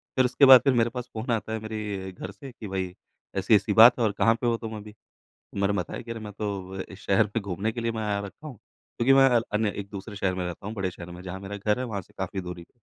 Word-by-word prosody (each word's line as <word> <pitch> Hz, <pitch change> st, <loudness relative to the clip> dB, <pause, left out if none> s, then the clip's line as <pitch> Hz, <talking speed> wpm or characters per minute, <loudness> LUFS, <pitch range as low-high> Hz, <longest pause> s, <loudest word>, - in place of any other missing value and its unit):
फिर 130 Hz, -, +4 dB
उसके 125 Hz, +3 st, +4 dB
बाद 130 Hz, -2 st, +10 dB
फिर 135 Hz, -, +3 dB
मेरे 120 Hz, -1 st, +3 dB
पास 125 Hz, 0 st, -6 dB
फ़ोन 115 Hz, +3 st, -3 dB
आता 110 Hz, -1 st, -1 dB
है 110 Hz, -, -2 dB
मेरे 105 Hz, -3 st, -5 dB
घर 95 Hz, +1 st, -8 dB
से 130 Hz, +7 st, -11 dB
कि 115 Hz, -3 st, -9 dB
भई 95 Hz, -2 st, -3 dB, 0.4 s
ऐसी-ऐसी 100 Hz, +1 st, +3 dB
बात 115 Hz, +4 st, +8 dB
है -, -, +2 dB
और 105 Hz, -, +2 dB
कहाँ 115 Hz, 0 st, +4 dB
पे 120 Hz, -, +1 dB
हो 115 Hz, -1 st, +2 dB
तुम 110 Hz, -1 st, -6 dB
अभी। 105 Hz, 0 st, -11 dB, 0.6 s
मैंने 100 Hz, 0 st, +1 dB
बताया 90 Hz, -, -5 dB
कि 115 Hz, -, -8 dB
अरे! 115 Hz, -, -5 dB
मैं 105 Hz, -1 st, -8 dB
तो 100 Hz, -3 st, -4 dB
अ, -, -, -2 dB
इस 95 Hz, -, -11 dB
शहर 100 Hz, +2 st, +3 dB
में 115 Hz, -, +1 dB
घूमने 100 Hz, +2 st, -2 dB
के 120 Hz, -, -5 dB
लिए 115 Hz, 0 st, 0 dB
मैं 110 Hz, -1 st, -4 dB
आया 105 Hz, -1 st, 0 dB
रखा 125 Hz, +10 st, -11 dB
हूँ। 140 Hz, -, -8 dB, 0.4 s
क्योंकि 130 Hz, +3 st, +4 dB
मैं 135 Hz, 0 st, +7 dB
अ, 120 Hz, -2 st, +4 dB
अन्य 105 Hz, 0 st, +2 dB
एक-दूसरे 100 Hz, +1 st, -7 dB
शहर 95 Hz, -1 st, 0 dB
में 90 Hz, -1 st, -2 dB
रहता 90 Hz, +3 st, -6 dB
हूँ, 105 Hz, -, -4 dB
बड़े 95 Hz, -3 st, -2 dB
शहर 90 Hz, 0 st, -10 dB
में 90 Hz, +1 st, -9 dB
जहाँ 95 Hz, 0 st, -6 dB
मेरा 100 Hz, +1 st, -6 dB
घर 105 Hz, +3 st, 0 dB
है 130 Hz, -, -2 dB
वहाँ 105 Hz, -5 st, -4 dB
से -, -, -24 dB
काफ़ी 95 Hz, 0 st, -3 dB
दूरी 90 Hz, -1 st, -7 dB
पे। -, -, -27 dB
105 Hz, 285 wpm, -26 LUFS, 95-115 Hz, 0.6 s, बाद